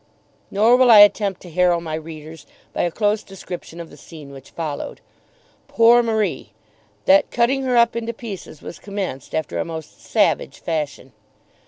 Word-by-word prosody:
Nor 220 +5 +4
will 255 -1 +4
I 225 - +9
attempt 205 -1 +3
to 175 - -11
harrow 175 0 +2
my 165 -2 -6
readers 155 -1 -9 0.3
by - - -1
a 175 - +1
close 210 +4 0
description 180 -3 -9
of 170 -1 -9
the 145 - -14
scene 150 -2 -12
which 135 -1 -13
followed. 155 -4 -6 0.7
Poor 235 +1 +5
Marie! 220 -3 -2 0.5
That 290 +1 +4
cutting 255 +3 +1
her 250 -2 +1
up 235 0 +4
into 235 0 -3
pieces 215 - -9
was - - -9
commenced 195 -10 -6
after 160 -1 -3
a - - 0
most 160 -2 -9
savage - - 0
fashion. 150 -5 -4
185 Hz, 165 wpm, -21 LUFS, 160-230 Hz, 0.7 s, I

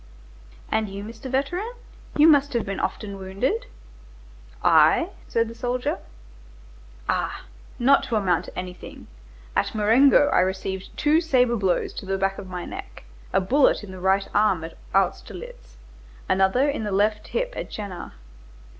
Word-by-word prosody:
"And 220 -1 +1
you, 200 +1 -6
Mr. 225 +4 -8
Veteran, 350 - -1 0.4
you 300 +2 +7
must 285 -3 +5
have 235 - 0
been 195 0 -4
often 200 -2 -3
wounded?" 195 +6 -2 1.0
"I?" - - +5 0.2
said 230 0 +1
the 230 - -8
soldier, 245 +1 -2 1.1
"ah! - - -1 0.3
not 275 +3 +4
to 235 - -2
amount 185 -5 +1
to - - -12
anything. 180 0 -8 0.5
At - - 0
Marengo, 245 +7 +5
I - - +3
received 190 +1 -2
two 305 +2 +3
sabre 250 -7 +3
blows 190 -5 -1
on 195 - -11
the 195 - +1
back 195 0 -1
of 190 - -9
my 180 -1 -5
neck, - - -9 0.3
a - - +3
bullet 255 +6 +3
in 200 - -9
the 185 - -9
right 190 +1 +2
arm 205 -5 +3
at 165 - -8 0.2
Austerlitz, - - -2 0.5
another 195 +9 +3
in 285 -6 -1
the 210 - -3
left 210 +2 +1
hip - - -2
at - - -5
Jena. 200 -4 -7
210 Hz, 155 wpm, -24 LUFS, 190-260 Hz, 1.1 s, you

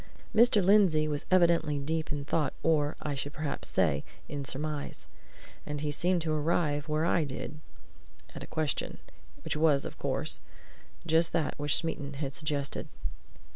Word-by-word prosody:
Mr. 220 -3 +5
Lindsey 185 -6 +5
was 145 -1 -3
evidently 170 -5 +4
deep 160 +3 -2
in 145 -1 -3
thought, 150 0 0
or, 150 -2 +2
I 150 - -1
should 140 +1 -4
perhaps 150 -2 -2
say, - - +1 0.2
in 145 -1 -4
surmise. 145 +2 -4 0.6
And 150 -1 -4
he 150 -1 -1
seemed 175 +3 +1
to 160 -1 0
arrive 150 -1 +1
where 155 +1 +1
I 170 -1 +3
did 145 +2 -6 0.7
at - - -8
a - - -7
question; 155 -4 -2 0.5
which - - -2
was, 150 -2 +3
of - - -7
course, - - +1 0.7
just 165 0 +3
that 160 -3 +1
which 145 0 +2
Smeaton 145 -4 -2
had 140 -1 -4
suggested. 145 -2 -2
155 Hz, 155 wpm, -30 LUFS, 145-165 Hz, 0.7 s, Mr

